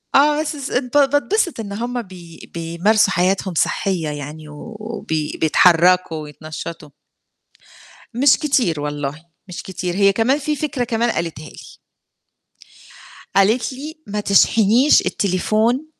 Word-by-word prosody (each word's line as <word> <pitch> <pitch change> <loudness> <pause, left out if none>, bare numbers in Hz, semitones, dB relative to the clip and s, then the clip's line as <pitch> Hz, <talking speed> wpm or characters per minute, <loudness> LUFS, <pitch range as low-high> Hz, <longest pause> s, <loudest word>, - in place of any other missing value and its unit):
آه، 295 +2 +4
بس 305 0 -3
س 275 -2 -6
بات 270 +2 +2
باتبسط 345 - 0
إن 205 -3 -6
هُم 240 +3 -3
بي 175 -5 -13
بيمارسوا 180 +6 +1
حياتهم 185 +1 0
صحيّة 175 -3 0
يعني 150 +1 -7
و 180 +9 -10
وبي 160 -9 -4
بيتحرّكوا 175 +1 +4
ويتنشّطوا. 155 +1 -8 1.2
مش 260 +4 +4
كتير 245 - 0
والله، 145 +1 -5 0.2
مش 180 - -7
كتير، 180 -1 -4
هي 200 0 +4
كمان 235 +6 +2
في 300 +1 -2
فكرة 290 -4 -2
كمان 235 0 0
قالتها 160 -2 -5
لي. - - -14 1.6
قالت 220 +7 +2
لي 295 +5 -8
ما 210 +1 -3
تشحنيش 220 +6 +4
التليفون 215 - 0
200 Hz, 125 wpm, -19 LUFS, 165-250 Hz, 1.6 s, آه